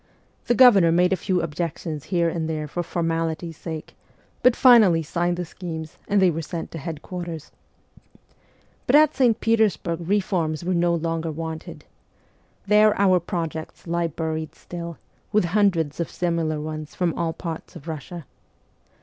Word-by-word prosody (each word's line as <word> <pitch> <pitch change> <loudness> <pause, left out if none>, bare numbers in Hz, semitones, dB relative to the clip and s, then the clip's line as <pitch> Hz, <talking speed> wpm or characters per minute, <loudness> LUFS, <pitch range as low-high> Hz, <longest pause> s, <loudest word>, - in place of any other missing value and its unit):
The 240 - +3
Governor 205 -9 +7
made 180 +2 +3
a - - +3
few 185 -1 -1
objections 160 -1 -4
here 170 -3 +1
and 165 -1 -2
there 155 -1 -3
for 175 +4 -3
formality's 165 -1 -2
sake, 160 -2 -7 0.5
but 250 -1 +5
finally 215 -10 +6
signed 175 +3 -1
the 175 - -3
schemes, 160 -2 -7
and 205 - +2
they 185 -2 +5
were 165 +1 -3
sent 165 +1 -6
to 165 - -6
headquarters. 165 +1 -6 1.4
But 255 - +4
at 305 0 +6
St. 240 -4 +3
Petersburg 215 -7 +1
reforms 175 -6 0
were 185 - 0
no 170 0 +2
longer 165 0 -2
wanted. 160 0 -6 0.8
There 210 +1 +4
our 185 -2 +5
projects 165 -3 -5
lie 170 0 0
buried 160 0 -4
still, 170 -2 -7 0.3
with 210 -3 +3
hundreds 170 -6 +1
of 170 - -2
similar 165 -3 -1
ones 155 0 -6
from 175 -3 0
all 165 -1 -2
parts 165 -1 -7
of - - -10
Kussia. 165 +2 -7
170 Hz, 150 wpm, -24 LUFS, 160-185 Hz, 1.4 s, Governor